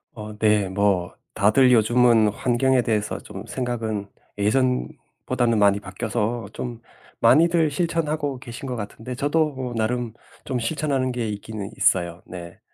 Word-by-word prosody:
어 105 -1 -8
네 105 -2 +3
뭐 95 -3 +1 0.2
다들 125 +6 +4
요즘은 115 -1 +4
환경에 125 +3 +2
대해서 105 -3 -1
좀 - - -9
생각은 110 -5 -3 0.3
예전보다는 120 0 0
많이 100 0 +4
바뀌어서 110 +4 -3
좀 120 -2 -6 0.4
많이들 165 +2 +4
실천하고 150 -3 -1
계신 120 +2 -8
것 125 - -3
같은데 115 +3 -6
저도 150 +3 +1
어 125 -2 -4
나름 115 +1 -1 0.3
좀 125 -2 -2
실천하는 135 0 -1
게 120 -2 -2
있기는 105 -1 -6
있어요 85 -1 +1
네. 85 -1 -9
120 Hz, 285 characters per minute, -23 LUFS, 105-130 Hz, 0.4 s, 다들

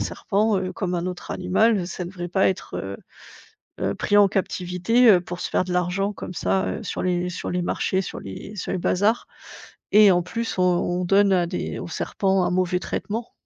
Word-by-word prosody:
serpent, 210 0 0
heu, 185 0 -3
comme 180 -2 -3
un 170 0 -1
autre 180 -1 -6
animal, 190 +1 +2
ça 180 0 -5
devrait 175 0 -6
pas 190 +2 +3
être, 190 - -4
heu 95 0 -5 0.9
heu, - - 0
pris 205 - 0
en 205 -1 +7
captivité, 190 +5 +2
heu, 180 -4 +6
pour 175 0 -7
se - - -3
faire 185 - +1
de 180 - -4
l'argent 180 +3 0
comme 185 - -7
ça, 190 +2 0
heu, - - -4
sur - - -4
les 180 -1 0
sur 175 - -5
les 180 0 -1
marchés, 190 +2 0
sur 185 - -6
les 100 - -8
sur 195 - -4
les - - -1
bazars 205 +6 +1 0.7
et 210 -1 +8
en 175 - +2
plus, 230 +6 -4
on 185 - +3
on 180 0 +1
donne 195 +2 +4
à 180 -2 +3
des 180 - -4
aux - - -6
serpents 190 -2 0
un - - 0
mauvais 180 0 +1
traitement. 220 +5 -4
185 Hz, 210 wpm, -23 LUFS, 180-200 Hz, 0.9 s, et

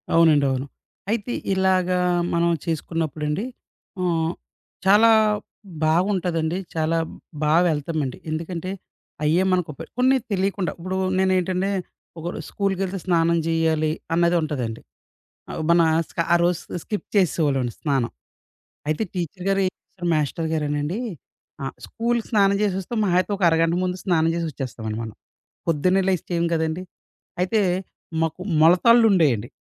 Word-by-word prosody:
అవునండి. 160 -4 +5
అవును. 130 +1 -2 0.5
అయితే 230 +1 -1 0.2
ఇలాగా, 185 -1 +2 0.4
మనం 170 0 +2 0.2
చేసుకున్నప్పుడండి. 160 - -2 0.5
హ్మ్. 165 -2 +1 0.5
చాలా 210 +4 +6 0.7
బాగుంటదండి. 170 -1 +1 0.2
చాలా 160 +1 +1 0.5
బా 150 0 +3 0.2
వెళ్తామండి. 150 -3 -2
ఎందుకంటే, 170 +3 -4 0.5
అయ్యే 160 +5 +3
మనకు 180 -4 0
పె - - -7
కొన్ని 260 +1 +5
తెలియకుండా. 195 -3 0
ఇప్పుడు 185 +2 -3 0.2
నేనేంటంటే 185 0 +1 0.5
ఒక 160 - -8
రొ - - -6
స్కూలుకెళ్తే 195 -1 -1
స్నానం 170 -2 +3
జేయ్యాలి 160 -1 +1 0.2
అనేది 170 +1 +3
ఉంటదండి. 130 -8 -3 0.9
మనం 170 0 +5 0.2
స్క - - -9
ఆరోజు 175 0 +1
స్కిప్ 210 - -4
చేసేవాళ్ళవండి 145 - +2
స్నానం. 135 -6 0 0.8
అయితే 155 +7 0
టీచర్ 180 0 -4
గారు 195 0 +2
ఏం 185 - 0
చేస్తారు. 175 -2 -8
మాస్టర్ 155 +1 0
గారేనండి. 150 +4 -1 0.6
ఆహ్, 135 - -4
స్కూల్‌కి 235 0 -1
స్నానం 200 -3 +4
జేసేసి 200 -3 +1
వస్తాం. 225 +5 -4
మహా 180 -3 +1
అయితే 195 - -7
ఒక 190 - -3
అరగంట 165 +1 +2
ముందు 180 0 -1
స్నానం 165 -4 +2
జేసి 170 -1 -1
వచ్చేస్తామండి 115 -6 -5
మనం. 110 -1 -7 0.5
పొద్దున్నే 180 +4 +2
లేచి 185 -3 +1
చేయం 170 -1 +1
కదండి! 160 +2 -1 0.6
అయితే 210 +4 +2 0.6
మాకు 160 +2 -3 0.2
మొలతాళ్లు 225 +9 +6
ఉండేయండి. 135 - +2
170 Hz, 125 wpm, -23 LUFS, 155-190 Hz, 0.9 s, చాలా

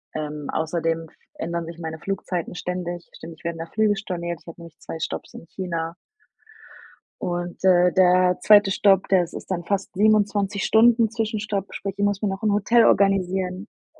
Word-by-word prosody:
Ähm, 150 -1 -5
außerdem 165 0 -1
f - - -27 0.2
ändern 170 0 -3
sich 165 +1 -9
meine 160 -1 -5
Flugzeiten 180 -2 -4
ständig. 175 -1 -5
Ständig 160 -1 -11
werden 170 -1 -3
da 165 - -4
Flüge 215 +2 +1
storniert, 175 -4 -4
ich - - -26
habe 165 +1 -10
nämlich 170 -2 -13
2 165 - -7
Stopps - - -5
in - - -10
China 170 -2 -4 1.3
und 175 0 -4
d 180 -1 +5
der 180 0 +4
zweite 205 -2 +6
Stopp, 195 -1 +3
das 180 -3 +2
ist - - -9
dann 175 -2 -2
fast 195 +2 -2
27 205 0 +2
Stunden 230 0 +5
Zwischenstopp, 215 -3 -3
sprich, 195 -1 -5
ich 205 - -1
muss 205 -1 0
mir 210 - 0
noch 195 +2 -5
'n 210 -1 +2
Hotel 225 +3 +4
organisieren 190 0 +1 0.3
u - - -26
185 Hz, 175 wpm, -23 LUFS, 170-205 Hz, 1.3 s, zweite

